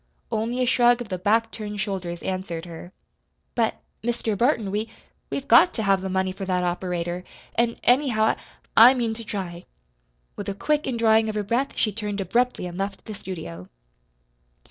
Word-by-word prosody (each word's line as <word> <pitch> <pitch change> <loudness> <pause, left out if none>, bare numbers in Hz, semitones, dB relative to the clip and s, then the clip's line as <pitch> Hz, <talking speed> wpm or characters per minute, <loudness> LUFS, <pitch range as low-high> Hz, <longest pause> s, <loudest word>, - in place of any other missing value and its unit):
Only 235 +3 0
a - - +2
shrug 245 0 +4
of 240 -3 -6
the 185 -2 -3
back 225 +4 +2
turned 210 -1 -5
shoulders 185 -4 -3
answered 185 -3 -3
her. 175 +1 -9 0.6
"But, 230 -2 +1 0.3
Mr. 235 -2 -1
Burton, 230 -2 +1
we 215 +2 -2 0.4
we've 275 0 -4
got 355 - +6
to 220 - -1
have 195 -2 +3
the 190 - -3
money 190 0 0
for 195 +1 -7
that 180 -1 0
operator; 175 0 -2 0.3
an', 235 0 +1
anyhow, 245 -4 +3
I - - +2 0.4
I 235 +3 +9
mean 235 -3 0
to 230 +1 -7
try." 185 -5 -5 0.7
With - - -5
a 195 - -3
quick 300 +8 0
indrawing 225 -3 +3
of 215 - -4
her 210 - 0
breath 240 +7 -1
she 215 - +2
turned 210 -1 -4
abruptly 235 +3 0
and 175 +1 -6
left 195 0 -4
the 215 - -6
studio. 160 - -7
210 Hz, 180 wpm, -24 LUFS, 185-235 Hz, 0.7 s, I